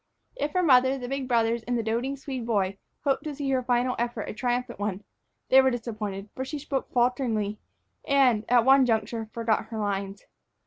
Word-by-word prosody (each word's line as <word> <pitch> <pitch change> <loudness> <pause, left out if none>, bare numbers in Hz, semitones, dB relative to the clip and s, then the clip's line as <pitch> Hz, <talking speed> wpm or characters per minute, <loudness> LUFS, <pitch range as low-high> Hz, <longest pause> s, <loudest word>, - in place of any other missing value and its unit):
If 300 -11 -2
her 365 - +2
mother, 260 -3 +5
the 250 -2 -6
big 270 0 -3
brothers, 230 -1 +2
and 245 0 0
the 230 - -1
doting 240 +5 -1
Swede 265 -2 -5
boy 200 -3 0 0.2
hoped 275 -1 +1
to 300 -2 -4
see 275 -1 -2
her 260 -1 +2
final 250 0 +1
effort 235 -2 -2
a - - -4
triumphant 245 +2 -2
one, 205 -1 -3 0.5
they 265 +1 +8
were 265 - +3
disappointed, 215 -5 -4
for 260 - -4
she 280 +3 -5
spoke 280 -2 -4
falteringly 240 -4 0 0.5
and, 260 -7 +4
at 240 -1 +5
one 265 -1 +6
juncture, 225 0 -1
forgot 225 -2 0
her 220 0 -7
lines. 200 -1 -3
240 Hz, 190 wpm, -27 LUFS, 220-265 Hz, 0.5 s, they